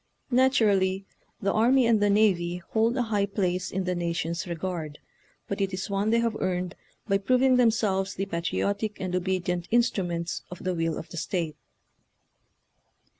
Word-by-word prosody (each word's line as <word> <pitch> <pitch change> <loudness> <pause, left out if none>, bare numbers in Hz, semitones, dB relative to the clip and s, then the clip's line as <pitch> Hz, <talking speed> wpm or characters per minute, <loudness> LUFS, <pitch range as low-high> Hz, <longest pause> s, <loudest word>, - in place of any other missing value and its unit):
Natu 260 -2 +4
rally 190 -1 +2 0.4
the 200 - +2
army 245 +4 +4
and 225 -2 +3
the 205 - +3
navy 185 -4 +2
hold 230 +3 +2
a 250 - +2
high 205 -3 0
place 185 -2 -1
in 190 0 -2
the 180 0 -1
nation's 170 0 -2
regard, 170 -3 -4 0.5
but 200 0 -3
it 195 -1 0
is 190 +2 -5
one 200 +2 +1
they 230 - +3
have 230 -1 0
earned 180 -1 -1 0.3
by 195 -1 +2
proving 255 +5 +3
themselves 215 -5 +2
the 195 - -2
patriotic 200 +4 -2
and 185 -1 -2
obedient 180 -1 -1
instruments 180 -8 0
of 180 - -9
the 185 -1 0
will 165 -1 -1
of 165 - -7
the 170 - -8
state. 165 -2 -2
190 Hz, 165 wpm, -27 LUFS, 175-215 Hz, 0.5 s, Natu